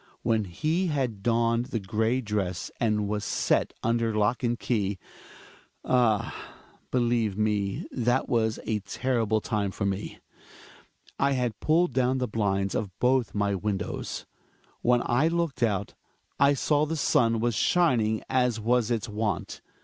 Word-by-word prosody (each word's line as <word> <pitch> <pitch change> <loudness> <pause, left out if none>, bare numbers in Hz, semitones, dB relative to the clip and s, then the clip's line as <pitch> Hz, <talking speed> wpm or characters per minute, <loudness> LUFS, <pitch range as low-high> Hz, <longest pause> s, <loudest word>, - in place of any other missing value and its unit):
When 110 -2 +1
he 155 - -1
had 130 - -1
donned 115 +1 +1
the 120 -4 -2
gray 110 +6 0
dress, 100 -5 -3
and 105 -3 +1
was 105 0 -2
set - - +1
under 115 -1 +1
lock 105 +3 +1
and 120 -1 0
key 105 -5 -1 0.5
— - - -25
ah! 120 -5 +2 0.5
believe 120 -5 +1
me 105 -2 0
that 120 +1 +1
was 110 -1 +1
a 110 -1 0
terrible 110 +1 0
time 105 -3 -1
for 100 +1 -3
me. 100 +1 -3 1.0
I 140 0 +3
had 125 -4 -1
pulled 160 -1 +2
down 130 +1 +2
the 125 -1 -1
blinds 100 -3 0
of 105 - -2
both 125 -2 +1
my 100 0 +1
windows. 100 0 -3 0.6
When 120 0 +3
I 125 +6 +2
looked 165 -5 -1
out, 105 -4 0 0.5
I 140 0 +5
saw 145 +2 +2
that 160 - -2
the - - -2
sun 115 -5 +2
was 120 +1 +1
shining 115 - +2
as 125 -3 +1
was 120 +1 +1
its 115 -4 -1
wont. 105 -3 -3
115 Hz, 150 wpm, -27 LUFS, 105-125 Hz, 1.0 s, I